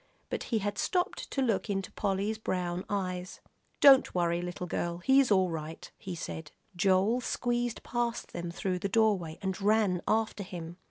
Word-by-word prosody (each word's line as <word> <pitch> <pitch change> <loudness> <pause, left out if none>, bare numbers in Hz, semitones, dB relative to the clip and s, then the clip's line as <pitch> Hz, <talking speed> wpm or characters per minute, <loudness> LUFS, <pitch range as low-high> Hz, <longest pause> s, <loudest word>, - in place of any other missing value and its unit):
But - - -2
he 235 - 0
had 205 -1 -2
stopped 365 +2 -1
to 270 - 0
look 225 -3 0
into 195 -2 -2
Polly's 205 +2 -1
brown 180 -3 -2
eyes. 185 -3 -3 0.4
"Don't 270 -7 +7
worry, 170 -1 +1
little 180 0 -4
girl, 170 0 -2
he's 265 +8 +4
all 190 -3 +3
right," 160 0 -6
he 185 -2 -6
said. 160 -2 -6 0.2
Joel 195 +5 +3
squeezed 240 -1 -1
past 240 -1 -2
them 170 0 -4
through 180 +1 -2
the 200 - -2
doorway, 200 -7 +2
and 190 0 -2
ran 205 -3 +3
after 220 -1 +1
him. 175 -3 -7
195 Hz, 165 wpm, -30 LUFS, 175-220 Hz, 0.4 s, Don't